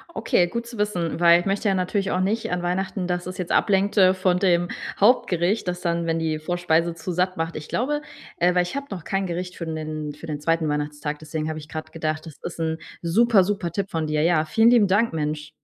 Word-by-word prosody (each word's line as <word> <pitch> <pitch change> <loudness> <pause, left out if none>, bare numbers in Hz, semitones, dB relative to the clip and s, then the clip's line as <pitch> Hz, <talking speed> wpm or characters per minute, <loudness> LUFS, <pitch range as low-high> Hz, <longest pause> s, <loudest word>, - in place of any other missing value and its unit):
Okay, 180 -5 +2
gut 235 +6 -4
zu 235 -1 -9
wissen, 180 -6 -1
weil 170 0 +6
ich - - -10
möchte 200 +2 0
ja 195 - +3
natürlich 190 +2 -1
auch 185 - +1
nicht 215 +4 0
an 180 0 -1
Weihnachten, 185 +1 -2
dass 180 0 -2
es 185 0 -6
jetzt 180 -2 -4
ablenkt, 200 +1 +2
äh, 185 -1 +6
von 185 -1 +1
dem 175 -2 +2 0.3
Hauptgericht, 200 -3 +3
das 180 0 -2
dann 170 -1 0
wenn 165 0 +1
die 160 -1 -1
Vorspeise 170 0 0
zu 170 +2 -5
satt 180 +1 0
macht. 165 +1 -2
Ich 155 - -6
glaube, 295 +5 -1 0.4
äh 175 +1 +3
weil 180 - +4
ich 175 - -6
habe 280 0 -4
noch 185 -5 -6
kein 195 +2 -1
Gericht 180 +1 -4
für 170 - -5
'nen 155 -2 -4
für 150 +3 -11
den 150 -2 -4
2. 165 +1 +1
Weihnachtstag, 150 0 -3
deswegen 155 0 -4
habe 155 0 -4
ich 150 - -11
grad 155 0 -6
gedacht: 155 0 -3
„Das 160 -3 -11
ist 170 - -7
'n 160 -1 -1 0.2
super, 205 +4 +4
super 195 -2 -2
Tipp 195 +3 -3
von 160 -1 -1
dir.“ 150 0 0
Ja, 160 -2 +3
vielen 225 +8 +4
lieben 230 -4 +5
Dank, 205 +5 +2
Mensch. 150 -1 -3
175 Hz, 240 wpm, -24 LUFS, 160-195 Hz, 0.4 s, weil